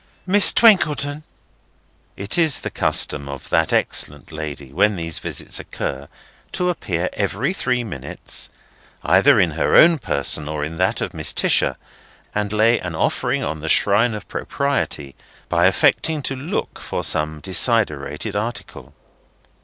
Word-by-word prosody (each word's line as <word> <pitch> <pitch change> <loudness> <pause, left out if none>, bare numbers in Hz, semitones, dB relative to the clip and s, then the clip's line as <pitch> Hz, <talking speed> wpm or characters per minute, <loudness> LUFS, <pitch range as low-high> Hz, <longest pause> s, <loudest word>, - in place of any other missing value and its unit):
—Miss 200 +2 +6
Twinkleton." 150 -9 +3 1.0
It 100 +2 +1
is 160 -5 +4
the - - -5
custom 70 -1 +1
of 70 -1 -9
that 80 -1 +1
excellent 75 +2 0
lady 75 -3 -7
when 105 +6 +2
these 80 -3 -3
visits - - -3
occur, 70 +1 -6 0.5
to 180 0 -1
appear 90 - -2
every 105 - -2
three 125 -8 -1
minutes, 70 - -4 0.5
either - - +4
in - - +2
her - - 0
own 165 -1 +6
person 75 - 0
or 75 -1 -3
in 80 +2 -8
that 95 - 0
of - - -3
Mrs. - - -1
Tisher, - - +2 0.6
and 105 -1 -2
lay 110 +2 +2
an 85 -3 -6
offering - - -1
on 80 +2 -4
the 80 +1 -5
shrine 110 +6 +3
of 105 - -9
Propriety 135 - -3 0.4
by 85 +1 +3
affecting 150 +10 +1
to 135 - -3
look 145 +9 -5
for - - -5
some 75 0 0
desiderated 95 - +1
article. 115 +4 -6
100 Hz, 145 wpm, -20 LUFS, -, 1.0 s, Miss